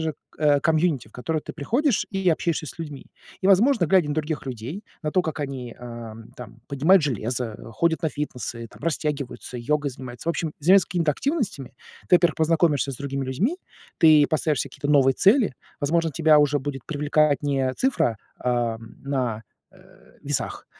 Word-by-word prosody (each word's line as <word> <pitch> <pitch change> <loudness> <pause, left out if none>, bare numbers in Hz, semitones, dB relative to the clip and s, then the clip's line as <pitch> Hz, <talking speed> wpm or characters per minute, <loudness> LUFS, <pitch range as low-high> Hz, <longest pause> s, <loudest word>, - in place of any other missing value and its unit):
же, 160 -1 -2 0.2
э, 145 -1 +4
комьюнити, 160 -2 +1
в - - -26
которое 155 +5 -2
ты - - -8
приходишь 235 - 0
и 195 -2 0
общаешься 160 -1 0
с - - -9
людьми. 150 -4 -7 0.3
И, 190 - 0
возможно, 200 - +4
глядя 180 -2 +3
на 145 - -1
других 155 -2 -3
людей, 130 - -6 0.2
на 150 -1 -2
то, 185 - +3
как 160 -2 -4
они, 130 -4 -5
ам, 115 -2 -9
там 120 -1 -11
поднимают 155 +5 +4
железо, 120 -2 -2 0.2
ходят 165 +5 +1
на 160 - +2
фитнесы 125 -5 -5
там, - - -17
растягиваются, 150 -5 -3
йогой 145 +4 -1
занимаются, 130 +4 -8
в - - +5
общем, 160 -1 -3
заниматься 185 +5 +5
какими-то 165 -4 +1
активностями, 230 - -3 0.3
ты, 180 - +7
во-первых, 175 -1 +2
познакомишься 160 -3 +2
с - - -7
другими 140 0 -3
людьми, 205 - -1 0.4
ты 155 -2 +7
поставишь 155 -3 0
себе 140 - -8
какие-то 145 +2 -5
новые 135 -3 +5
цели. 200 - +4 0.3
Возможно, 165 +3 +1
тебя 155 0 +4
уже 145 0 +2
будет 135 -2 -5
привлекать 150 -1 +1
не 135 -2 +1
цифра, 160 - +1 0.2
а, 120 -2 0
на, 120 -1 -4 0.3
э, - - -19 0.4
весах, - - -3
150 Hz, 175 wpm, -24 LUFS, 130-165 Hz, 0.4 s, ты